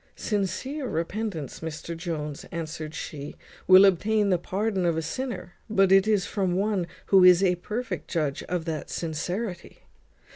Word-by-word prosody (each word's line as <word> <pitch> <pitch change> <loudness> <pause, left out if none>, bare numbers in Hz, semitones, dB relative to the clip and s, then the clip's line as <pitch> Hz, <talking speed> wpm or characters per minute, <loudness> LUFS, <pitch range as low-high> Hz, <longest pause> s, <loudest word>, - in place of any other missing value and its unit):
"Sincere 230 - -2
repentance, 170 - -3
Mr 160 +1 -6
Jones," 155 -4 -4
answered 160 -1 -5
she, 145 -3 -6 0.3
"will 185 +1 +9
obtain 205 +2 +2
the 180 - +3
pardon 195 +2 -1
of 170 -2 +1
a - - 0
sinner, 185 - -5 0.2
but 195 -3 +3
it 195 +2 +6
is 210 -4 +2
from 190 -4 -1
one 195 -2 0 0.3
who 190 -1 +8
is 180 +1 +7
a 180 -2 +4
perfect 230 +7 -4
judge 150 -5 -1
of 175 -2 -2
that 160 -3 -4
sincerity. 175 +4 -4
180 Hz, 150 wpm, -26 LUFS, 165-205 Hz, 0.3 s, will